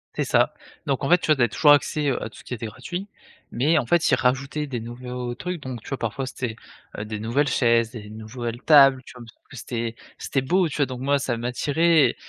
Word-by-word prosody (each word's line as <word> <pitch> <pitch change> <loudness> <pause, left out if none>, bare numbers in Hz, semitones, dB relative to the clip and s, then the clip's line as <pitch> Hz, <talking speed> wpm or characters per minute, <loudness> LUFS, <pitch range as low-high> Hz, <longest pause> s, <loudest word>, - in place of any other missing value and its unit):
C'est - - 0
ça, - - +2 0.3
donc 135 0 -1
en 135 - 0
fait, 175 +1 +6
tu - - -4
vois? 155 - +5
Tu 135 - -2
avais 120 - +4
toujours 150 +7 +4
accès, 145 +1 +3
heu, 130 - -1
à - - -4
tout - - -15
ce - - -14
qui 125 - -5
était 115 - -6
gratuit, 175 - -6 0.4
mais 150 +7 +2
en 135 - +1
fait 170 +6 +2
ils 130 - +5
rajoutaient 135 +4 0
des 130 -4 -4
nouveaux 125 +1 -6
trucs, 180 +4 -5
donc 130 -4 -6
tu - - -10
vois? 135 - -3
Parfois 125 +4 -3
c'était, 125 -3 -5 0.4
heu, 105 - -4
des 105 0 -5
nouvelles 120 +7 0
chaises, 115 -3 +2
des 105 -4 -9
nouvelles 115 +2 -6
tables, 135 -4 +6
tu - - -12
vois? 120 - -10 0.3
C'était 115 -3 -4 0.2
c'était 135 - -1
beau 180 +7 +2
tu 155 - -6
vois? 145 - +2
Donc 130 -1 -6
moi 140 +1 +2
ça 120 -3 -2
m'attirait 145 +7 +2
130 Hz, 240 wpm, -24 LUFS, 120-145 Hz, 0.4 s, fait